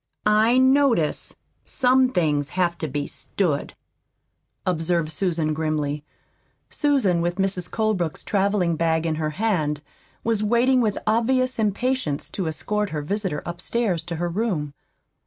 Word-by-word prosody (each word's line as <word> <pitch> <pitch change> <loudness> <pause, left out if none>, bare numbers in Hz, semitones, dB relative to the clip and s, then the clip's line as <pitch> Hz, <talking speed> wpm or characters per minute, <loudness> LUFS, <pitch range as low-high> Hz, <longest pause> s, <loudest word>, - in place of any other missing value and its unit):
"I 215 +3 +4
notice 260 - +3 0.3
some 255 0 +3
things 150 - 0
have 175 -2 +2
to 160 - -2
be 145 +1 -3
stood," 155 -2 -2 0.9
observed 170 -2 0
Susan 160 -3 0
grimly. 150 -2 -2 0.7
Susan, 255 - +2
with 175 +1 -1
Mrs. 190 -2 -1
Colebrook's 210 -8 -1
traveling 195 -4 +1
bag 160 0 +1
in 160 - +1
her 155 -1 -1
hand, 155 -9 0 0.4
was 225 -2 +1
waiting 240 +4 +3
with 215 -3 0
obvious 255 +3 +1
impatience 215 - -1
to 185 -4 -3
escort 210 +6 -2
her 150 -3 -3
visitor 190 -2 -2
upstairs 175 +1 -1
to 170 -1 -4
her 175 +2 -1
room. 170 -6 -2
180 Hz, 130 wpm, -23 LUFS, 160-225 Hz, 0.9 s, I